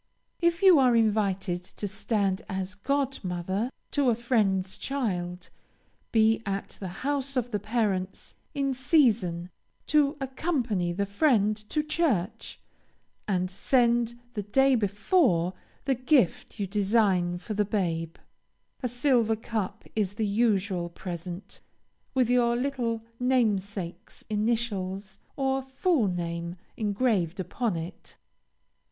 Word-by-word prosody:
If 340 +2 +1
you 370 -6 +8
are 250 -3 +5
invited 200 -5 +1
to 200 +2 -6
stand 195 -1 0
as 190 0 -3
god 275 +6 -1
mother 185 +5 -2 0.2
to 280 -3 +2
a 235 - +3
friend's 205 -6 0
child, 180 -10 -3 0.6
be 225 0 +4
at 195 -1 -3
the 190 - -4 0.2
house 275 -1 -1
of 245 -1 -1
the 210 - 0
parents 205 -3 -1 0.2
in 275 -1 +1
season 230 - +2 0.3
to 295 -1 +3
accompany 260 - -1
the 200 +3 -1
family 210 0 +3 0.2
to 300 - 0
church, 290 - -1 0.7
and 185 -2 0
send, 235 +2 +2 0.2
the 210 - -2
day 270 +7 +3
before, 205 - +2 0.3
the 275 - +3
gift 255 - +1
you 200 - 0
design 195 -3 +2
for 215 +4 -6
the 210 0 +2
babe. 170 -5 -1 0.7
A 255 - 0
silver 245 -2 +2
cup 220 -2 -4
is 205 -2 0
the 220 0 0
usual 200 -4 +1
present, 175 +1 -7 0.5
with 255 -3 +3
your 240 -1 +3
little 240 -3 -1 0.2
namesake's 205 -8 -1
initials, 210 -3 -1 0.2
or 270 -1 0
full 265 - +1
name, 170 -1 -3 0.2
engraved 205 -5 0
upon 200 +3 -1
it. 165 +3 -8
215 Hz, 120 wpm, -28 LUFS, 190-250 Hz, 0.7 s, you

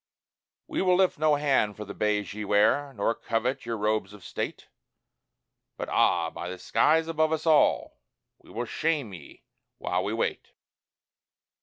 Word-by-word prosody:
We - - -2
will 185 -1 +4
lift 185 -4 +2
no 155 -1 +4
hand 135 -8 +1
for 105 - -6
the 100 - -8
bays 105 -1 -1
ye 105 +1 -5
wear, 105 +8 +2
nor 100 +2 +1
covet 115 +2 -2
your 115 -1 -2
robes 105 -1 -1
of 105 -3 -13
state - - -5 1.1
But - - -5
ah! 85 -2 +2
by 90 - -6
the 90 - -6
skies 160 - +2
above 160 -1 +1
us 160 0 -2
all, 155 -2 +3 0.4
we - - -21
will 120 +2 -4
shame 145 -5 -1
ye 80 -6 -12 0.3
while - - -1
we - - -2
wait! - - -3
115 Hz, 160 wpm, -27 LUFS, 105-155 Hz, 1.1 s, will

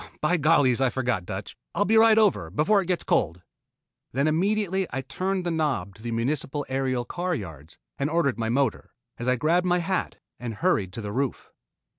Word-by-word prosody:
"By 165 +4 +2
gollies 140 -5 +4
I 135 - +4
forgot, 120 -9 -1
Dutch. 95 +1 -6 0.2
I'll 205 - +2
be 220 - +2
right 220 0 +6
over 195 - +3
before 155 - +3
it 180 - -6
gets 180 -2 0
cold." 85 +3 0 0.7
Then 140 +4 +1
immediately 190 +3 +1
I 135 - -2
turned 185 +7 -2
the 175 - -1
knob 140 - -1
to 105 - -17
the 120 - -5
Municipal 135 +5 -1
Aerial 130 -2 -1
car 175 +6 -2
yards, 80 - -8 0.2
and 140 +1 0
ordered 145 -8 +1
my 110 -1 -1
motor, 135 +3 -1 0.2
as 120 - -4
I 125 - +3
grabbed 170 +7 +2
my 180 0 +3
hat 180 +1 -1 0.2
and 120 -2 -5
hurried 100 -2 +1
to 115 - -5
the 105 -1 -5
roof. 130 +3 -3
140 Hz, 195 wpm, -26 LUFS, 115-175 Hz, 0.7 s, right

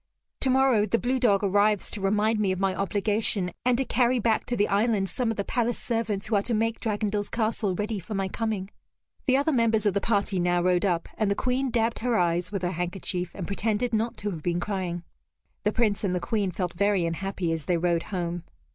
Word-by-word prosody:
Tomorrow, 260 -5 +4
the 230 - +2
blue 255 +2 0
dog 210 -5 +3
arrives 205 +1 +2
to 210 - -4
remind 210 +3 +2
me 200 -3 +2
of 185 - -2
my 195 -1 +1
obligation, 205 -1 0
and 250 -1 +3
to 265 - 0
carry 250 +1 +2
back 225 -1 +1
to 245 - -1
the 205 - +3
island 205 -1 +1
some 245 +5 -1
of 225 - -2
the 200 - 0
palace 240 +2 0
servants 225 -4 -2
who 220 - 0
are 200 - +3
to 230 +3 -1
make 225 +1 0
Dragondel's 210 -1 -1
castle 220 -4 -1
ready 210 +2 -2
for 195 +4 -6
my 195 0 0
coming." 210 -1 -3 0.6
The 260 0 +5
other 285 +3 +1
members 225 -5 +2
of 205 - +3
the 200 - 0
party 200 -3 +1
now 175 0 +2
rode 180 +1 +2
up, 175 -3 0
and 215 -2 +2
the 200 - +1
Queen 255 +3 0
dabbed 230 -1 0
her 240 -1 +1
eyes 175 +1 +1
with 195 -3 -3
her 175 - 0
handkerchief, 180 0 -3
and 185 - -4
pretended 220 +4 -1
not 225 +2 0
to 205 0 -3
have 165 -4 -6
been 175 +2 -1
crying. 180 -3 -3 0.6
The 210 - +3
Prince 215 -3 +1
and 185 -2 0
the - - 0
Queen 205 -1 -1
felt 180 -1 -3
very 200 -1 +2
unhappy 175 +1 -2
as 160 -3 -3
they 175 +1 +1
rode 170 0 +1
home. 175 -2 -3
205 Hz, 225 wpm, -26 LUFS, 185-225 Hz, 0.6 s, The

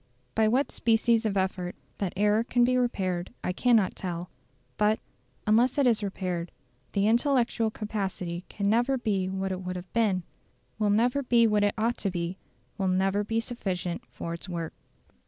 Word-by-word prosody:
By 220 -1 +3
what 255 +6 +2
species 230 -1 +2
of 200 -2 -1
effort 185 -1 -1 0.2
that 195 -3 -1
error 210 +2 +3
can 240 0 +2
be 255 +1 +3
repaired 185 -8 0
I 180 - -1
cannot 225 -2 +3
tell; 175 -2 -5 0.5
but, 210 +1 +3 0.5
unless 235 +5 +3
it 280 - +4
is 230 -3 +3
repaired, 180 -4 -3 0.4
the 200 0 +2
intellectual 235 -1 +2
capacity 195 -5 -4
can 200 -1 -2
never 240 +5 +3
be 200 -6 0
what 190 0 -2
it 185 0 -3
would 180 0 -4
have 180 0 -8
been, 205 -6 +2 0.6
will 210 -1 +2
never 245 +7 +3
be 240 -3 +4
what 210 -2 +3
it 205 - +2
ought 230 +2 +1
to 200 - 0
be, 175 0 -3 0.4
will 190 - +1
never 190 +2 +2
be 225 +2 0
sufficient 185 -7 -3
for 170 - -5
its 170 +3 -7
work. 170 -2 -4
205 Hz, 175 wpm, -28 LUFS, 185-230 Hz, 0.6 s, it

